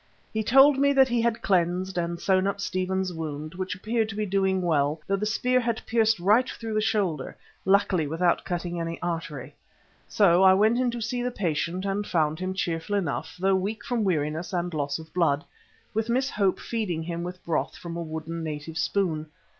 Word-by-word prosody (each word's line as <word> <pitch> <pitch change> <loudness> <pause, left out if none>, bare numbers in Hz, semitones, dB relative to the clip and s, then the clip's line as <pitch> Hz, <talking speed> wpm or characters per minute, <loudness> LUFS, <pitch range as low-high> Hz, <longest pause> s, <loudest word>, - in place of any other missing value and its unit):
He 220 - 0
told 270 +5 +6
me 280 0 +4
that 265 -1 +5
he 240 -1 +1
had 230 -1 0
cleansed 185 0 +1
and 170 -1 -2
sewn 190 +1 +2
up 200 0 -2
Stephen's 185 -1 -1
wound, 155 -1 -5
which 185 0 -4
appeared 220 +3 -1
to 210 - -6
be 215 0 -1
doing 190 -1 +1
well, 150 -2 +1
although 195 0 0
the 210 - -1
spear 250 +3 +2
had 235 -2 -2
pierced 220 -3 +2
right 210 +8 +3
through 225 -1 -5
the 215 - +1
shoulder, 200 - -1 0.3
luckily 190 -5 +3
without 170 +3 +1
cutting 175 -1 -3
any 165 0 -4
artery. 165 -6 -4 0.5
So 185 -4 +4
I 190 0 +7
went 220 +5 +3
in 255 -1 +2
to 235 0 -4
see 245 +2 -2
the 250 - 0
patient 175 -3 -2
and 200 +1 -1
found 155 -1 +1
him 185 +1 -3
cheerful 170 +1 -2
enough, 175 -8 -2
though 195 +1 +3
weak 195 +4 -2
from 240 -3 0
weariness 160 -1 -1
and 175 -1 -1
loss 145 -2 -1
of 160 0 -12
blood, 160 -4 +2 0.5
with 220 +1 -1
Miss 260 +3 +1
Hope 195 -3 +1
feeding 195 -9 -2
him 170 0 -4
with 180 +1 -7
broth 165 -2 -1
from 170 -1 -7
a 170 - -3
wooden 160 +1 -5
native 155 +1 -5
spoon. 160 -5 0
185 Hz, 200 wpm, -26 LUFS, 165-215 Hz, 0.5 s, I